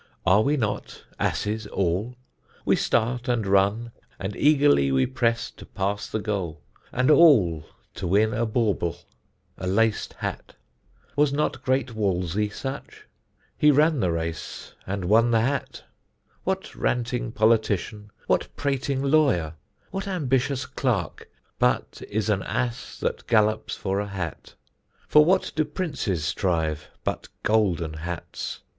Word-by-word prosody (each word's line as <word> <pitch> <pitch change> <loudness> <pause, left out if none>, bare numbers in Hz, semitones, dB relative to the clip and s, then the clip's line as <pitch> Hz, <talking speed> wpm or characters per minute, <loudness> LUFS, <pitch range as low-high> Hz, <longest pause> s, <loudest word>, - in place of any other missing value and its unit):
Are 95 +3 +5
we 145 +6 +2
not 110 -5 -3 0.2
asses 105 +1 -1
all? 100 +6 -1 0.5
We - - +4
start 120 +3 0
and 120 -4 +1
run, 100 +4 +2 0.3
And 100 +1 -4
eagerly 145 - +4
we 65 0 +3
press 115 -2 0
to - - -13
pass 100 +1 -2
the - - -2
goal, 95 -8 -3 0.3
And 130 +4 +2
all 115 - +5 0.3
to - - -4
win 105 +5 +3
a 115 +1 0
bauble, 105 -7 0 0.6
a 90 - -3
lac'd 110 +3 +1
hat. - - -6 0.6
Was 145 -1 +3
not 150 +2 -1
great 130 -1 0
Wolsey 100 -1 0
such? 135 +6 -7 0.5
He 150 - +4
ran 150 +1 +4
the 90 -6 +1
race, 85 0 -5
And 95 -1 -3
won 115 +5 +4
the 115 -1 +3
hat. 135 +4 -2 0.6
What - - -2
ranting 125 0 -1
politician, 110 -2 +1 0.2
What - - +1
prating 140 -1 -1
lawyer, 135 - +3 0.4
what 195 +1 -4
ambitious 135 -7 0
clerk, 120 - -2 0.3
But 60 0 +1
is 110 +1 -1
an 105 -3 +1
ass 120 +4 -3
that - - -2
gallops 110 -2 +2
for 95 0 -2
a 105 - -2
hat? 95 -5 -6 0.5
For 150 - +7
what 185 +4 +2
do 155 - +3
Princes 145 - -2
strive, 80 -6 -1
but - - -3 0.2
golden 90 -8 +1
hats? 85 +2 -6
110 Hz, 135 wpm, -25 LUFS, 95-130 Hz, 0.6 s, For